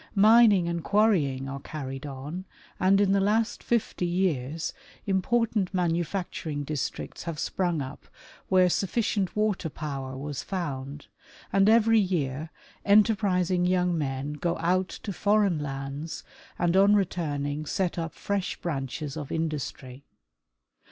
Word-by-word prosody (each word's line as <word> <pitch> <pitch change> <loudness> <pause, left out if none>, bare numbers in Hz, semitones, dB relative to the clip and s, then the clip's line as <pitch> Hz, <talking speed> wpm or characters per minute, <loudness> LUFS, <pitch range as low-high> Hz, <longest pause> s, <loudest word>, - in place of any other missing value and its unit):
Mining 210 -3 +6
and 170 -1 -2
quarrying 150 -9 +2
are 135 0 -5
carried 135 -1 -6
on, 145 +7 -6 0.3
and 195 +1 +4
in 200 -1 +3
the 200 - +4
last 220 +4 +1
fifty 225 -6 0
years 165 -4 -1 0.3
important 205 +1 +1
manufacturing 170 -3 -1
districts 145 -1 -4
have 165 -2 -4
sprung 175 -2 -1
up 130 +2 -10 0.4
where 185 -1 +5
sufficient 195 +1 0
water 210 -5 0
power 135 -4 -5
was 145 0 -4
found, 145 -6 -5 0.5
and 195 +1 +5
every 225 0 +5
year 155 -6 -1 0.3
enter 215 +2 +5
prising 180 -3 +1
young 180 -1 +2
men 140 -1 -2
go 170 +3 -1
out 180 +3 +1
to 200 - -6
foreign 200 -4 +2
lands 140 +2 -5 0.3
and 175 0 +1
on 200 +2 +6
returning 150 -6 -1
set 180 -1 -1
up 165 0 -4
fresh 200 -2 -2
branches 140 -2 -4
of 150 -3 -6
industry. 145 -4 -4
170 Hz, 130 wpm, -27 LUFS, 145-195 Hz, 0.5 s, Mining